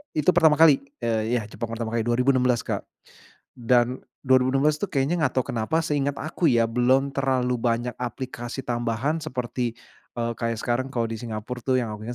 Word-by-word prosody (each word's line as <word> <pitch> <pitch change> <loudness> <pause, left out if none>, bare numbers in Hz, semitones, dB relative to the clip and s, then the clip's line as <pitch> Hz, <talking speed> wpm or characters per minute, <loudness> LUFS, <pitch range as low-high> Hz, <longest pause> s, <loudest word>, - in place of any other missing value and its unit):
itu 155 +4 +4
pertama 160 -3 +5
kali. 155 -3 +6 0.2
Eee, 115 +1 0
ya 115 - 0
Jepang 110 +2 -6
pertama 115 -1 -4
kali. 115 0 -1
2016 125 0 +2
Kak. - - -4 0.7
Dan 120 +1 +1 0.2
2016 135 +3 +3
itu 205 - -3
kayaknya, 155 +4 +1
enggak 130 - +1
tahu - - -5
kenapa, 120 +8 0
seingat 145 -3 0
aku 160 +3 -4
ya, 115 -1 +3
belum 130 +4 +2
terlalu 130 -2 +1
banyak 120 0 -1
aplikasi 125 0 -5
tambahan, 120 +5 -1
seperti 125 -5 -3 0.4
eee, 115 0 -2
kayak 115 -1 -2
sekarang 125 +2 -1
kalau 115 -2 -1
di 115 - -3
Singapura 115 +2 -5
tuh 130 - +1
yang 115 -3 -3
aku 110 - -10
inget 120 - -4
125 Hz, 180 wpm, -25 LUFS, 115-135 Hz, 0.7 s, kali